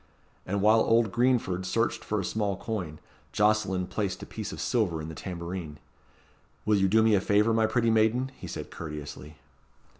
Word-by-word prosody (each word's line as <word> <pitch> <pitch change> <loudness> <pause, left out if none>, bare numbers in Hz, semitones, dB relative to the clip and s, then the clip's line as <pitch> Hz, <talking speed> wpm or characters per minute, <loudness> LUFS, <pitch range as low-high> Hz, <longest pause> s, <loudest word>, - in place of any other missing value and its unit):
And 100 +1 -1
while 110 +2 +6
old 115 -1 +3
Greenford 120 -7 +1
searched 115 +5 -1
for 105 - -1
a 95 - -2
small 100 -2 -1
coin, 90 -10 -4 0.4
Jocelyn 105 -3 +2
placed 100 0 -3
a - - -5
piece - - -6
of - - -7
silver 100 -10 0
in 80 +1 -6
the - - -7
tambourine. 85 -3 -6 0.9
"Will 105 0 +3
you 95 - +3
do 110 +3 +4
me 110 -1 +4
a 100 - +4
favour, 105 +3 +3
my 110 -1 +3
pretty 115 0 +2
maiden?" 115 +4 +2
he - - -9
said - - -7
courteously. 75 -1 -8
105 Hz, 180 wpm, -28 LUFS, 90-110 Hz, 0.9 s, while